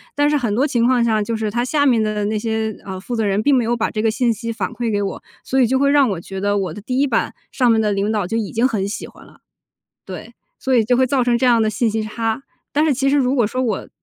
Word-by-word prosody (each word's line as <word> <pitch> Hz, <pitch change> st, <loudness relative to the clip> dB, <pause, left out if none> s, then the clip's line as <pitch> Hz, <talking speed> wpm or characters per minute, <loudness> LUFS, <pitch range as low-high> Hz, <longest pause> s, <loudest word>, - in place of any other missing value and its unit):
但 290 Hz, 0 st, +3 dB
是 300 Hz, -, +2 dB
很 235 Hz, -7 st, -1 dB
多 260 Hz, +5 st, +2 dB
情 240 Hz, -5 st, +1 dB
况 250 Hz, -2 st, +3 dB
下， 220 Hz, -2 st, +2 dB
就 225 Hz, +2 st, -2 dB
是 215 Hz, -1 st, -2 dB
他 240 Hz, +3 st, 0 dB
下 285 Hz, +3 st, +1 dB
面 240 Hz, -5 st, +3 dB
的 215 Hz, -1 st, -1 dB
那 215 Hz, +1 st, -1 dB
些， 220 Hz, -1 st, -2 dB
呃， 190 Hz, -1 st, -6 dB
负 220 Hz, +6 st, -5 dB
责 225 Hz, -, 0 dB
人 200 Hz, +1 st, 0 dB
并 285 Hz, -, +3 dB
没 250 Hz, -, +2 dB
有 235 Hz, +1 st, 0 dB
把 225 Hz, -, -1 dB
这 215 Hz, -, -2 dB
个 225 Hz, -, +2 dB
信 235 Hz, +1 st, +1 dB
息 230 Hz, +2 st, -5 dB
反 230 Hz, -, -3 dB
馈 235 Hz, -2 st, -2 dB
给 205 Hz, -1 st, 0 dB
我， 195 Hz, -, -5 dB, 0.2 s
所 265 Hz, 0 st, +1 dB
以 245 Hz, -, +4 dB
就 260 Hz, +3 st, +1 dB
会 280 Hz, +1 st, +3 dB
让 285 Hz, -3 st, +4 dB
我 190 Hz, -5 st, -2 dB
觉 190 Hz, +3 st, -7 dB
得 205 Hz, 0 st, +1 dB
我 185 Hz, -5 st, -2 dB
的 210 Hz, -, -9 dB
第 250 Hz, +5 st, -2 dB
1 280 Hz, -, +4 dB
版 280 Hz, -, -1 dB, 0.2 s
上 250 Hz, -3 st, +2 dB
面 225 Hz, -, +3 dB
的 215 Hz, -1 st, +1 dB
领 200 Hz, +1 st, 0 dB
导 210 Hz, -4 st, 0 dB
就 195 Hz, -, -3 dB
已 215 Hz, -3 st, -3 dB
经 235 Hz, +3 st, +2 dB
很 205 Hz, -6 st, -2 dB
喜 205 Hz, -, -5 dB
欢 -, -, -16 dB
了。 -, -, -20 dB, 0.7 s
对， -, -, -8 dB, 0.3 s
所 265 Hz, -, -1 dB
以 230 Hz, -3 st, +4 dB
就 245 Hz, +3 st, +2 dB
会 260 Hz, +1 st, +3 dB
造 260 Hz, -1 st, +2 dB
成 240 Hz, -1 st, +2 dB
这 235 Hz, -, -1 dB
样 235 Hz, -2 st, +4 dB
的 220 Hz, -, +2 dB
信 220 Hz, +2 st, 0 dB
息 220 Hz, +1 st, -1 dB
差。 225 Hz, +3 st, -3 dB, 0.3 s
但 300 Hz, +2 st, +2 dB
是 295 Hz, -, +2 dB
其 275 Hz, +2 st, +1 dB
实 285 Hz, -, +3 dB
如 260 Hz, -2 st, +2 dB
果 245 Hz, -4 st, +3 dB
说 255 Hz, +4 st, -3 dB
我 225 Hz, -6 st, -2 dB
230 Hz, 325 characters per minute, -19 LUFS, 215-255 Hz, 0.7 s, 以